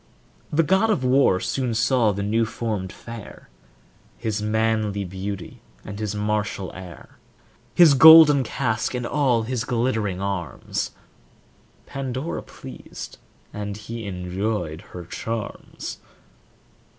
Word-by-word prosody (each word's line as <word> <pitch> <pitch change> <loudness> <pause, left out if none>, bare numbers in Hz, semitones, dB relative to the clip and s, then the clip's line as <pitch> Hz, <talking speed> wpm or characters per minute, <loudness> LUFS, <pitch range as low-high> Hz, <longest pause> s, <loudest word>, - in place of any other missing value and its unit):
The 165 +2 +3
god 190 +7 +3
of 205 -12 +1
war 125 -7 +4
soon 125 +2 -1
saw 120 -1 +3
the 100 0 -3
new 110 +3 +1
formed 110 -4 -3
fair; 115 -3 -10 0.7
His 110 -3 -2
manly 110 -1 0
beauty 95 +1 -6 0.2
and 100 +1 -7
his 105 -1 -3
martial 105 -2 -2
air, 90 -4 -11 0.6
His 170 -5 +8
golden 150 -1 +9
casque 120 -2 -1
and 125 -1 -2
all 125 -4 +2
his 120 0 -2
glittering 110 -5 -1
arms 100 -4 -3 1.0
Pandora 135 +3 -4
pleased, - - -10 0.3
and 105 0 -5
he 110 +1 -7
enjoyed 90 -2 -3 0.2
her 90 - -7
charms. 115 +4 -6
110 Hz, 115 wpm, -23 LUFS, 100-125 Hz, 1.0 s, golden